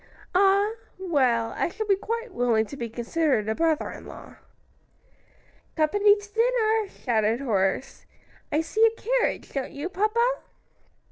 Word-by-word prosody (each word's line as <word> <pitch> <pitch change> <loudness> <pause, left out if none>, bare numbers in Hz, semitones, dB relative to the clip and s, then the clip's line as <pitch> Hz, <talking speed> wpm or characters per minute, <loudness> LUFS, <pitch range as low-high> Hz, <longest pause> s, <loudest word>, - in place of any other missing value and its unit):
"Ah! 395 +3 +4 0.3
well, 260 -11 +1
I - - 0
shall 435 +5 -4
be 400 -2 +3
quite 460 +2 -4
willing 235 -3 +2
to 280 - -9
be 235 -4 -5
considered 240 0 0
a 220 - +1
brother 320 +2 0
in - - -10
law." - - -12 1.4
"Company 410 +7 +4
to 410 0 -12
dinner!" 450 -2 +2
shouted 225 - 0
Horace. 210 -2 -1 0.4
"I 300 +2 +2
see 430 +7 0
a 455 0 +3
carriage; - - -1
don't 270 -2 -3
you, 290 +5 -4
papa?" 430 +5 +1
340 Hz, 140 wpm, -25 LUFS, -, 1.4 s, Ah